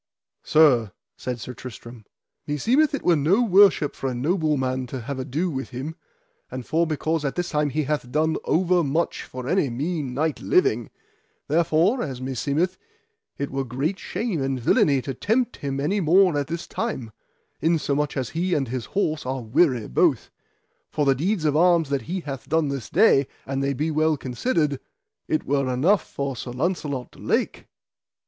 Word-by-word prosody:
Sir, 125 -10 +4 0.2
said 125 -1 -5
Sir 125 +2 -7
Tristram, 120 -2 -10 0.4
meseemeth 255 - +2
it - - -6
were 175 - +4
no 170 - +3
worship 195 -7 +5
for 135 - -3
a 125 - -4
noble 155 +3 +1
man 130 -1 -2
to 130 +1 -5
have 135 +3 -5
ado 145 +7 -2
with 135 -2 -4
him: 135 +5 -5 0.6
and 130 -1 -6
for 165 +1 +1
because 155 0 -1
at 140 - -2
this 175 -1 -2
time 150 -1 +1
he 155 +2 -1
hath 140 -3 -2
done 155 +2 +1
over 180 +1 +2
much 160 +4 -1
for 130 0 -8
any 175 -4 +2
mean 140 +1 -3
knight 155 +2 -1
living, 375 +2 +2 0.6
therefore, 170 - +2
as 130 -4 -4
meseemeth, 140 +6 -1 0.6
it 140 - -3
were 135 0 -1
great 135 +9 -2
shame 195 - -3
and 135 -1 -1
villainy 130 +2 +3
to 135 - -4
tempt 235 - 0
him 140 -1 -3
any 160 +9 0
more 180 0 +4
at 145 -2 -1
this 170 +2 -4
time, 130 - -4 0.5
insomuch 150 -2 0
as 130 -3 -2
he 175 +2 0
and 135 -4 -1
his 125 -1 -3
horse 155 -6 0
are 130 0 -3
weary 125 -1 +2
both; 60 - +1 0.6
for 150 - 0
the 135 - +5
deeds 170 - -1
of 150 -1 +2
arms 170 -2 +4
that 140 -2 0
he 185 +1 -2
hath 135 -4 -7
done 160 -1 +2
this 135 -4 -4
day, 160 -8 +4 0.2
an 135 0 -2
they 140 0 0
be 155 +5 -1
well 155 0 +2
considered, 145 - -1 0.5
it 155 - 0
were 140 -2 0
enough 165 +11 +3
for 140 -1 -4
Sir 125 - -6
Launcelot 140 -3 -2
du - - -18
Lake. - - -1
150 Hz, 180 wpm, -24 LUFS, 130-170 Hz, 0.6 s, worship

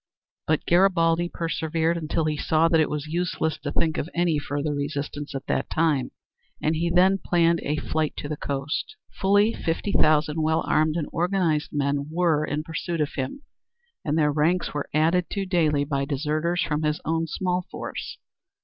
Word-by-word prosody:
But 155 -1 +1
Garibaldi 175 -2 +3
persevered, 165 0 -1
until 160 -1 -1
he 155 -1 0
saw 160 +2 +2
that 165 -1 +3
it 155 - +2
was 150 -1 -3
useless 160 -1 -1
to 145 0 -4
think 160 +1 0
of 160 - -3
any 170 -3 +2
further 145 +1 -2
resistance 145 0 -4
at 135 0 -5
that - - -1
time, 150 -6 +1 0.5
and 155 +1 0
he 170 +2 0
then 185 +3 +4
planned 170 -1 +3
a 150 - -1
flight 155 0 -1
to - - -4
the 150 - -3
coast. 145 - -3 0.2
Fully 205 +3 +3
fifty 165 +5 -2
thousand 155 -2 +3
well 160 +1 +1
armed 155 0 +2
and 165 -4 -1
organized 170 -3 0
men 140 0 -1
were 160 -2 +2
in 150 0 -2
pursuit 165 +1 -4
of 150 -2 -1
him, 135 - -4 0.6
and 155 0 0
their 150 -2 +3
ranks 160 +5 +1
were 145 -1 -3
added 165 +3 +2
to 200 -1 -1
daily 160 -6 +2
by 140 -1 -1
deserters 155 +5 0
from 150 -1 -1
his 150 0 0
own 165 0 0
small 180 +2 -2
force. - - -6
160 Hz, 175 wpm, -25 LUFS, 150-170 Hz, 0.6 s, then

